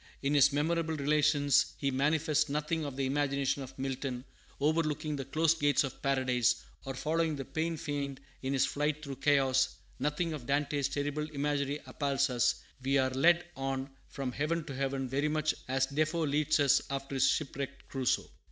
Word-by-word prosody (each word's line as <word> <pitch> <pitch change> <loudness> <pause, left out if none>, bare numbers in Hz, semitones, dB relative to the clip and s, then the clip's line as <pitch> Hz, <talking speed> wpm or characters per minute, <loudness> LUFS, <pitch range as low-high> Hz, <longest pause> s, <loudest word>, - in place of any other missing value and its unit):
In 140 +1 +1
his 140 -1 +6
Memorable 160 +2 0
Relations 145 -1 +3
he 140 -1 0
manifests 150 +2 +2
nothing 150 +2 -1
of 140 -2 -5
the 135 0 -1
imagination 140 0 0
of 130 - -9
Milton, 130 -1 -3 0.3
overlooking 155 0 0
the 135 -2 -4
closed 160 +3 +2
gates 145 -1 +3
of 135 - -6
paradise, 125 -3 +1 0.2
or 135 0 -4
following 160 +3 0
the 135 -2 -5
"pained 160 +3 -2
fiend" 140 -3 -3 0.2
in 135 +1 -2
his 135 -1 +3
flight 150 +1 -1
through 140 -3 -6
chaos; 135 -1 +3 0.2
nothing 155 +3 -1
of 135 -6 -7
Dante's 140 0 +1
terrible 145 +1 -2
imagery 145 0 -1
appalls 140 -2 0
us; 120 -1 +1 0.2
we 135 +2 +2
are 130 -1 +2
led 170 +7 +4
on 135 0 -3 0.2
from 135 -2 -4
heaven 155 +5 -1
to 145 - -7
heaven 135 0 -2
very 140 +4 0
much 155 0 +1
as 135 +1 +2
Defoe 155 +4 0
leads 150 +2 +2
us 140 -2 +5
after 140 0 -4
his 135 -1 +4
shipwrecked 140 -2 -3
Crusoe. 130 -2 0
140 Hz, 170 wpm, -31 LUFS, 135-150 Hz, 0.3 s, his